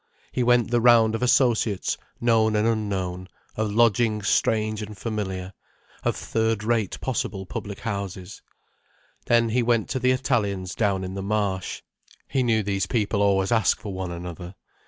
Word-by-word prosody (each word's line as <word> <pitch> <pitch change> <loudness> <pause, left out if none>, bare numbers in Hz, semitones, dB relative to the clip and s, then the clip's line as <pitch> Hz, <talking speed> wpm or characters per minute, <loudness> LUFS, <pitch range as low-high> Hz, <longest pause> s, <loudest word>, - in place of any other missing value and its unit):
He 125 - -1
went 120 -1 +3
the 120 -1 +3
round 115 -2 +5
of 115 - -2
associates 120 -5 +2 0.2
known 110 -2 +3
and 105 +1 +2
unknown, 95 -5 -2 0.3
of 110 -1 -1
lodgings 110 -1 +2
strange 110 0 +1
and 105 -1 -7
familiar, 95 -4 -4 0.5
of - - 0
third 110 -2 -1
rate 110 -3 0
possible 105 -6 -3
public 100 +2 -6
houses. 100 -3 -5 0.9
Then 115 -1 +3
he 125 +3 +2
went 115 -2 +1
to 130 - -1
the 125 +1 +2
Italians 105 -8 0
down 100 -4 0
in 95 0 -5
the 95 - -4
Marsh—he 100 +5 -3
knew 115 -3 +2
these 100 -1 -1
people 105 -1 0
always 100 0 +2
ask 110 -3 +3
for 105 -2 -6
one 95 -1 -4
another. 90 +1 -7
105 Hz, 155 wpm, -24 LUFS, 95-115 Hz, 0.9 s, round